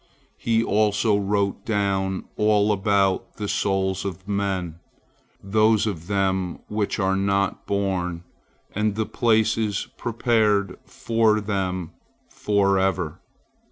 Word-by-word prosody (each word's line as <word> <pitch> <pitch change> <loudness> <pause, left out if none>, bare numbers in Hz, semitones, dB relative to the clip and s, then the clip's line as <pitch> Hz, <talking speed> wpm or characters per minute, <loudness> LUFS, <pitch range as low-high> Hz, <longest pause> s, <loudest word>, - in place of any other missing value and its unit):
He 115 -1 +1
also 105 0 +2
wrote 100 0 0
down 100 -3 -1
all 105 0 +3
about 100 -1 +1
the 105 - -4
souls 95 -1 0
of 95 -1 -6
men, 95 -5 -2 0.6
those 110 +2 +3
of 85 -6 -4
them 95 -3 0
which 105 -1 -1
are 95 -2 +1
not 100 0 0
born, 90 -4 -1 0.5
and 105 0 0
the 110 0 -1
places 110 -3 +1
prepared 110 -5 +1
for 115 -4 +1
them 95 -4 -2 0.4
forever. 95 -5 0
100 Hz, 105 wpm, -23 LUFS, 95-105 Hz, 0.6 s, all